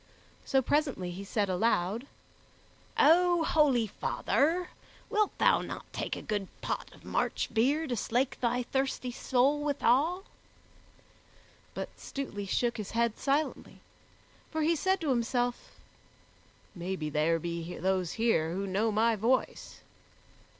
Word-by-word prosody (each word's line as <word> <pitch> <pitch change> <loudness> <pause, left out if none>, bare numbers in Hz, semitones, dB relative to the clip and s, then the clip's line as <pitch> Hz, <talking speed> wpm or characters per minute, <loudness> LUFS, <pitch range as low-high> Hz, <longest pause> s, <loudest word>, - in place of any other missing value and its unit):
So, 265 -1 +2
presently, 275 - 0
he 185 +3 -7
said 205 +1 0
aloud, 195 +4 0 0.9
"O 350 +2 +5
holy 285 -8 +3
father, 325 - 0 0.4
wilt 425 -2 +1
thou - - +4
not - - -6
take - - -3
a - - -8
good 205 -3 -2
pot - - -3
of - - -17
March - - -1
beer 275 +8 +2
to 255 -5 -2
slake 245 +4 0
thy 245 0 +1
thirsty 265 0 -2
soul 265 +4 +2
withal?" 295 +5 +2 1.5
But - - -4
Stutely 205 -8 -5
shook 235 +4 0
his 210 -3 -5
head 235 -1 +1
silently, 290 +3 -1 0.7
for 315 -1 -1
he 330 +2 +3
said 380 +5 +1
to 305 -4 0
himself, 245 0 -1 1.0
"Maybe 175 -4 -4
there 155 +3 +2
be 170 +1 -5
those 185 -1 0
here 220 -8 +1
who 195 +2 -2
know 200 +4 0
my 225 +2 +3
voice." 235 +5 -1
235 Hz, 130 wpm, -30 LUFS, 195-285 Hz, 1.5 s, O